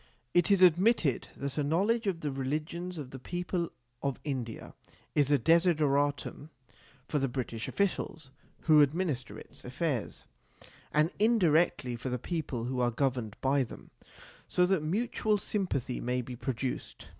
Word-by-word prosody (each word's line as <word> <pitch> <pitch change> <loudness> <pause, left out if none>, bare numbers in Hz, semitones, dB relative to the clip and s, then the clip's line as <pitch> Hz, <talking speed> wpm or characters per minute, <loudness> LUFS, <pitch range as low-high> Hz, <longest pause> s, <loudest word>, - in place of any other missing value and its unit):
It 175 +1 +4
is 195 -2 +5
admitted 180 - +4
that 140 +1 -3
a - - +2
knowledge 200 +10 +1
of 175 -4 -1
the 150 - -2
religions 155 +7 -3
of 140 -4 -6
the 135 - -8
people 175 +3 -3 0.3
of 140 -2 -2
India 130 -6 -4 0.4
is 145 -2 +3
a 145 - +5
desideratum 145 -1 +2 0.6
for 150 - 0
the 135 - +1
British 120 -3 -4
Officials 165 -7 -2 0.3
who 155 -2 +6
administer 145 -3 0
its - - -12
affairs 130 - -2 0.7
and 155 +3 +3
indirectly 175 - +3
for 125 +2 -4
the 125 - -1
people 140 -4 -3
who 125 +1 -2
are 120 -1 +3
governed 120 -3 -1
by 135 +1 +3
them 115 - -11 0.6
so 180 - +3
that 185 -3 +2
mutual 210 +5 0
sympathy 180 - -2
may 125 +1 -1
be 125 +1 -7
produced. 130 0 -4
150 Hz, 145 wpm, -30 LUFS, 130-175 Hz, 0.7 s, who